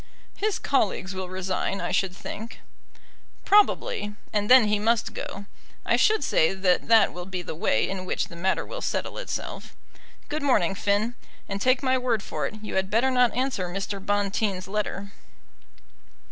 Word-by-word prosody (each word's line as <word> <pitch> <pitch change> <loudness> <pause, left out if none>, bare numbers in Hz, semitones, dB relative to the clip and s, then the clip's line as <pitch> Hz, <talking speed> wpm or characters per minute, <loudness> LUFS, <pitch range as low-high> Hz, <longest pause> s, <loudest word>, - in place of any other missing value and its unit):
"His 420 -1 0
colleagues 200 -7 0
will 185 -1 -5
resign, 185 +1 -2
I - - -3
should 190 -2 0
think." 225 +3 -8 0.8
"Probably; 410 - +3 0.2
and 205 -1 0
then 255 -1 +9
he 210 0 +1
must 225 +1 +1
go. 200 - -6 0.4
I - - +3
should 430 0 +3
say 160 +4 +2
that 190 -1 +1
that 225 -2 +5
will 180 0 -7
be 185 -2 -4
the - - -5
way 130 -8 +1
in 190 -1 -4
which - - -1
the 170 - -12
matter 185 +3 0
will - - -7
settle - - -3
itself. - - -6 0.5
Good 305 +1 -3
morning, 210 -10 +2
Finn; 205 +4 0 0.3
and 195 0 -4
take 255 +3 +3
my 260 -1 +2
word 235 -5 0
for 150 -2 -3
it, - - -8
you 215 - -3
had 190 0 0
better 235 +5 +2
not 250 -2 +3
answer 250 -8 -1
Mr. 195 +1 -4
Bonteen's 200 -2 0
letter." 200 -1 -3
205 Hz, 170 wpm, -26 LUFS, 190-250 Hz, 0.8 s, then